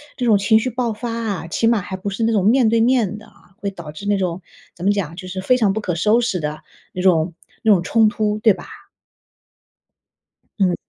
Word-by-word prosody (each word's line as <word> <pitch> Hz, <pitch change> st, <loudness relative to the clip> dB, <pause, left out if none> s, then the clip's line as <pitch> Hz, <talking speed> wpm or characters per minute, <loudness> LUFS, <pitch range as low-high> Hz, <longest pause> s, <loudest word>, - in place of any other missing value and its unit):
这 250 Hz, -, -2 dB
种 220 Hz, -4 st, +5 dB
情 220 Hz, +3 st, +3 dB
绪 255 Hz, -, -2 dB
爆 235 Hz, -2 st, -2 dB
发 230 Hz, +2 st, -5 dB
啊， 220 Hz, -7 st, -3 dB
起 225 Hz, +7 st, 0 dB
码 230 Hz, -4 st, +3 dB
还 190 Hz, +1 st, -6 dB
不 195 Hz, +2 st, -4 dB
是 200 Hz, +3 st, -3 dB
那 230 Hz, -, +2 dB
种 200 Hz, -4 st, +1 dB
面 235 Hz, +1 st, +4 dB
对 230 Hz, +1 st, +2 dB
面 225 Hz, -4 st, +2 dB
的， 215 Hz, -, -14 dB, 0.3 s
会 200 Hz, -, -2 dB
导 170 Hz, -6 st, -9 dB
致 155 Hz, +7 st, -10 dB
那 205 Hz, 0 st, +2 dB
种 185 Hz, -1 st, -2 dB, 0.3 s
怎 175 Hz, -, -8 dB
么 200 Hz, -, +4 dB
讲？ 170 Hz, -5 st, -3 dB
就 185 Hz, -1 st, -8 dB
是 185 Hz, +1 st, -5 dB
非 250 Hz, +7 st, +3 dB
常 210 Hz, -5 st, +2 dB
不 220 Hz, -, -3 dB
可 180 Hz, -4 st, -2 dB
收 215 Hz, +7 st, +3 dB
拾 195 Hz, -6 st, -1 dB
的 150 Hz, -1 st, -4 dB, 0.3 s
那 180 Hz, -, -4 dB
种 170 Hz, -2 st, +2 dB, 0.3 s
那 220 Hz, -2 st, +6 dB
种 180 Hz, -3 st, +1 dB
冲 220 Hz, +3 st, +3 dB
突， 210 Hz, -1 st, -1 dB
对 220 Hz, -1 st, +5 dB
吧？ -, -, -11 dB, 1.9 s
嗯。 185 Hz, -3 st, +2 dB
205 Hz, 240 characters per minute, -20 LUFS, 185-225 Hz, 1.9 s, 那